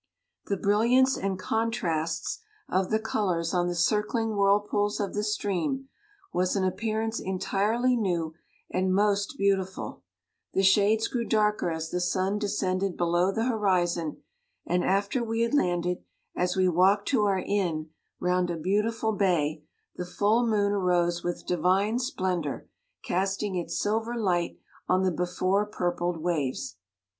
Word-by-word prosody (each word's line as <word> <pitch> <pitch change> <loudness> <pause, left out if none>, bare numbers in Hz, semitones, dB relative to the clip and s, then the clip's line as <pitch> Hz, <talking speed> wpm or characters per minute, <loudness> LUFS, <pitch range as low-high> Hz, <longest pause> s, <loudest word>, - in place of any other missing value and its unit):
The 200 - 0
brilliance 235 +7 +3
and 195 0 -1
63 - - -10
contrasts 170 -8 -1 0.3
of 185 0 0
the 220 - +3
colours 190 -6 -1
on 175 -1 +2
the 175 - -2
circling 215 +5 +1
whirlpools 205 +1 +2
of 200 -2 -2
the 210 - -1
stream, 210 - -1 0.4
was 180 +2 +1
an 195 - +1
ap 185 -1 0
pearance 225 0 -1
entirely 210 +6 +1
new 175 -8 -1 0.4
and 185 0 +1
most 200 0 +1
beau 200 0 +3
tiful; 190 - -6 0.5
the 195 - +2
shades 205 +3 +4
grew 240 -2 -2
darker 210 -4 +1
as 160 -1 -4
the 180 - -1
sun 190 +3 0
descended 195 -2 -1
below 175 +2 +2
the 225 +3 -1
horizon, 180 -8 0 0.4
and 180 0 +1
after 200 +6 +1
we 225 0 -1
had 235 +3 0
landed, 180 -8 +1 0.3
as 180 0 0
we 185 -1 +3
walked 190 +4 +3
to 240 -7 +3
our 195 -2 +2
inn 170 -6 -1 0.3
round 180 0 +1
a 170 - -2
beautiful 210 +6 0
bay, 160 -6 +1 0.3
the 180 - -3
full 215 +6 +2
moon 205 -2 +2
arose 175 -3 +1
with 175 0 -3
divine 190 +6 +2
splendour, 185 - -2 0.4
casting 195 +1 -1
its 175 -2 -2
silver 225 +3 -1
light 180 -7 0 0.3
on 185 +1 +3
the 185 - +2
before 185 +3 0
purpled 175 -4 -2
waves. 145 - -2
195 Hz, 150 wpm, -27 LUFS, 175-210 Hz, 0.5 s, shades